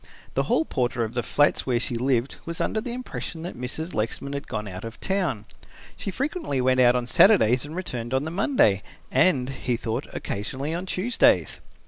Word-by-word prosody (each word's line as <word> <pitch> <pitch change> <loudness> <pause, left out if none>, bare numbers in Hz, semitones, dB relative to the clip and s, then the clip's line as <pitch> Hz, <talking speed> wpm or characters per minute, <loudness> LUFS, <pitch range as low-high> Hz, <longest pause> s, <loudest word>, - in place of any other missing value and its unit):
The - - +2
hall 320 - +3
porter 120 - 0
of 110 - -4
the 120 - 0
flats 145 +4 +2
where 120 -2 +2
she 120 - -2
lived 125 +1 0
was 170 0 -5
under 215 - 0
the 240 +1 -4
impression 240 -9 -5
that 175 - -6
Mrs. 125 +8 -5
Lexman 115 +6 -2
had 140 0 -5
gone 105 -1 -4
out 95 -1 -7
of 115 0 -8
town. 175 - -1 0.5
She - - -5
frequently 265 - -2
went 130 0 +3
out 125 -1 +6
on 125 -1 0
Saturdays 125 - +5
and 150 +3 -8
returned 125 -10 -4
on 130 +1 +1
the 160 - -4
Monday 175 - +3 0.3
and, 135 -9 +3
he 125 -3 -2
thought, 115 -1 -3
occasionally 135 +9 -3
on 180 +3 -4
Tuesdays. 225 +7 +2
130 Hz, 190 wpm, -25 LUFS, 120-180 Hz, 0.5 s, out